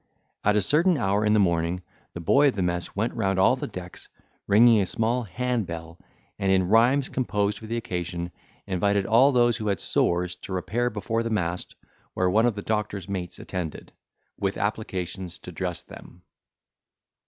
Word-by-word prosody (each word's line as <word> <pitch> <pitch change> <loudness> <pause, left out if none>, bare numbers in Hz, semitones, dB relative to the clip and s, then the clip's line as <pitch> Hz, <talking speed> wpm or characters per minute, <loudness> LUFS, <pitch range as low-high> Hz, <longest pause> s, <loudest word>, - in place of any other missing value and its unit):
At 105 0 +3
a 105 - +3
certain 165 - +3
hour 100 -3 +1
in 105 0 +3
the 110 - +4
morning, 85 -1 +1 0.3
the - - -4
boy 140 - +4
of 135 - +1
the 95 - -1
mess 90 0 -2
went 110 +4 -1
round 95 0 0
all 95 +7 +5
the 130 - -5
decks, 90 0 -9 0.4
ringing 110 +1 +6
a - - +1
small 115 +5 0
hand 125 0 -2
bell, 85 0 -7 0.4
and, 95 0 +1
in 95 -1 +3
rhymes 125 +5 +4
composed 105 -5 -1
for 110 - -10
the 115 +1 -2
occasion, 90 -4 -4 0.3
invited 100 +2 +1
all 125 +7 +5
those 120 -2 +3
who 110 -2 -4
had 100 -4 0
sores 90 +2 +1
to 95 - -8
repair 110 +7 -1
before 115 +1 -2
the 115 - -2
mast, 90 -5 -2 0.4
where 90 -1 +2
one 110 +4 +4
of 115 - 0
the 100 - -6
doctor's 105 -4 -2
mates 95 -3 -4
attended, 90 -4 -6 0.5
with 100 -1 -1
applications 95 -3 -3
to 90 - -10
dress 90 0 -4
them. 90 0 -14
100 Hz, 180 wpm, -25 LUFS, 90-115 Hz, 0.5 s, ringing